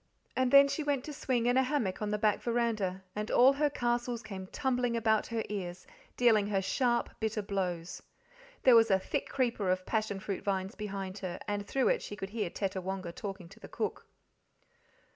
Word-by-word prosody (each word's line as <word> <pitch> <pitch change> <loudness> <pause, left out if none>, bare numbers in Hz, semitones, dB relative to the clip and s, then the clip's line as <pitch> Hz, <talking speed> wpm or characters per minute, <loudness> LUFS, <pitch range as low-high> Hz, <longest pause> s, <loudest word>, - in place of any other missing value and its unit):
And 260 -1 +2
then 280 +1 +8
she 295 - -2
went 285 -3 0
to 300 - -6
swing 250 -4 0
in 245 +1 +3
a - - +6
hammock 255 -9 -1
on 210 - -1
the 210 - 0
back 210 -1 +2
veranda, 220 -6 -1
and 210 +1 -3
all 260 +3 +6
her 295 +1 +2
castles 240 -2 -1
came 190 -2 -7
tumbling 245 -1 0
about 220 -1 +2
her 230 -1 -2
ears, 185 -4 -5 0.3
dealing 220 -4 +4
her 200 -2 +1
sharp, 240 +5 +1
bitter 220 -1 -1
blows. 185 -3 -3 0.6
There 255 -2 +7
was 225 -1 +6
a 190 - +5
thick 190 - -3
creeper 235 -7 0
of 185 0 0
passion 215 -3 -1
fruit 195 0 -4
vines 195 0 -1
behind 195 -2 -5
her, 185 -2 -4
and 205 -1 -2
through 270 - +2
it - - +2
she 205 - -6
could 195 -1 -6
hear 210 -5 -2
Tettawonga 190 -1 -3
talking 195 -4 -6
to 205 +4 -15
the - - -10
cook. - - -4
215 Hz, 195 wpm, -31 LUFS, 195-245 Hz, 0.6 s, then